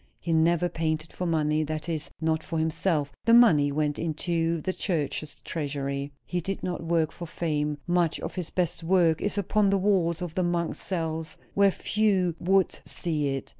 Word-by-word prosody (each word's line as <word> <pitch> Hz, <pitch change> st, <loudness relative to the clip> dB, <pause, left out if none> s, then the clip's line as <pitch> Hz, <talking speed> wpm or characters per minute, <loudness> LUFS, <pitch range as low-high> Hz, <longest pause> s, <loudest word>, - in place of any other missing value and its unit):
He 170 Hz, -, -2 dB
never 170 Hz, +2 st, +3 dB
painted 160 Hz, -1 st, -2 dB
for 180 Hz, -, -3 dB
money; 155 Hz, -1 st, +1 dB
that 155 Hz, +2 st, -4 dB
is, 160 Hz, -3 st, -3 dB
not 160 Hz, -1 st, 0 dB
for 165 Hz, -, -4 dB
himself; 160 Hz, -2 st, 0 dB
the 230 Hz, -, +6 dB
money 155 Hz, -13 st, +6 dB
went 150 Hz, 0 st, -1 dB
into 165 Hz, +1 st, 0 dB
the 185 Hz, +4 st, -2 dB
church's 155 Hz, -5 st, -3 dB
treasury. 140 Hz, -2 st, -3 dB
He 180 Hz, -1 st, -2 dB
did 195 Hz, +3 st, -4 dB
not 175 Hz, -2 st, -3 dB
work 165 Hz, -1 st, +1 dB
for 170 Hz, -, -8 dB
fame; 150 Hz, -2 st, -1 dB
much 175 Hz, -2 st, +1 dB
of -, -, -5 dB
his 180 Hz, -4 st, -4 dB
best 175 Hz, -1 st, -1 dB
work 165 Hz, -2 st, +3 dB
is 205 Hz, 0 st, 0 dB
upon 200 Hz, +1 st, +2 dB
the 195 Hz, -, +3 dB
walls 185 Hz, -4 st, +2 dB
of 170 Hz, -3 st, -5 dB
the 185 Hz, -, 0 dB
monks' 175 Hz, -1 st, -1 dB
cells, 160 Hz, -3 st, -3 dB, 0.2 s
where 200 Hz, 0 st, +5 dB
few 195 Hz, -3 st, +1 dB
would 190 Hz, +1 st, +2 dB
see 155 Hz, -4 st, -2 dB
it. 135 Hz, -, -6 dB
165 Hz, 180 wpm, -27 LUFS, 155-180 Hz, 0.2 s, the